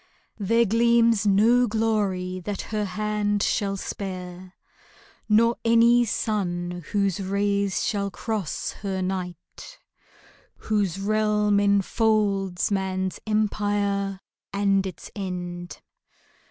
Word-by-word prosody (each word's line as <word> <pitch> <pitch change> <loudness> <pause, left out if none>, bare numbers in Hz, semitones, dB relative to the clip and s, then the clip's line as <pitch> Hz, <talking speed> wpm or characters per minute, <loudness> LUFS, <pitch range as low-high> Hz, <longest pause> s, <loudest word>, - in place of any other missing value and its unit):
There 230 +4 +3
gleams 230 0 +3
no 230 +5 +4
glory 205 -5 -1
that 195 +2 -4
her 210 -1 0
hand 205 +1 -1
shall 195 -1 0
spare, 185 -1 -6 0.7
Nor 230 +2 +4
any 235 +1 +5
sun 175 -5 -2
whose 200 -2 +1
rays 200 0 0
shall 200 -2 -1
cross 210 -4 -3
her 190 -2 -2
night, 185 - -6 0.8
Whose 200 -4 -1
realm 210 0 +2
enfolds 200 -2 +1
man's 190 -1 -1
empire 205 -2 0 0.3
and 195 -1 +1
its 185 - -9
end. 180 -3 -5
200 Hz, 95 wpm, -25 LUFS, 190-215 Hz, 0.8 s, any